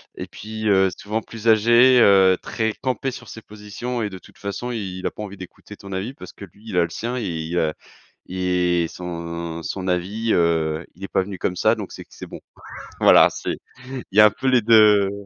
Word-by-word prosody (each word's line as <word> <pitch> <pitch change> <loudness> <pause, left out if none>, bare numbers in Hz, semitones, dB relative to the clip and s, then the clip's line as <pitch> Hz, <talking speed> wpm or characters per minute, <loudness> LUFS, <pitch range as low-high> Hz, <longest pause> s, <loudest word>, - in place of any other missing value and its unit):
et - - -7
puis, 110 +1 -6
heu, 95 -1 +4
souvent 110 +2 -3
plus 115 +1 -8
âgé, 120 +3 +6
heu, 95 -3 +5
très 110 -1 -2
campé 130 0 -2
sur 120 -1 -10
ses 110 - -9
positions 105 +4 -6
et 105 - -2
de 95 -1 -9
toute - - -19
façon, 105 +5 -5
il 95 -5 -5
a - - -3
pas 105 - -8
envie 100 -1 -8
d'écouter 95 +2 -12
ton 100 - -11
avis 95 +7 -4
parce 145 - -12
que 100 - -10
lui 100 +5 -22
il 90 - -3
a 85 - +5
le 85 - -3
sien, 120 +9 -4
et 120 - -3
il 85 -1 -3
a 75 -1 0 0.6
et 90 -2 0
son 85 -1 -6
son 95 +6 -5
avis, 100 +6 -1
heu, 80 -1 +1
il 95 - -10
est - - -5
pas 95 - +1
venu 95 0 -7
comme 90 - -2
ça - - +3
donc - - -7
c'est - - -9
que - - -43
c'est - - -9
bon. - - -10 0.6
Voilà, - - +7
c'est, - - -5 0.3
il 130 -1 -6
y 105 - +3
a - - +9
un 105 - +5
peu 130 +5 -4
les 125 -2 +4
2, 105 -2 +6
heu, - - -5
100 Hz, 230 wpm, -22 LUFS, 90-110 Hz, 0.6 s, a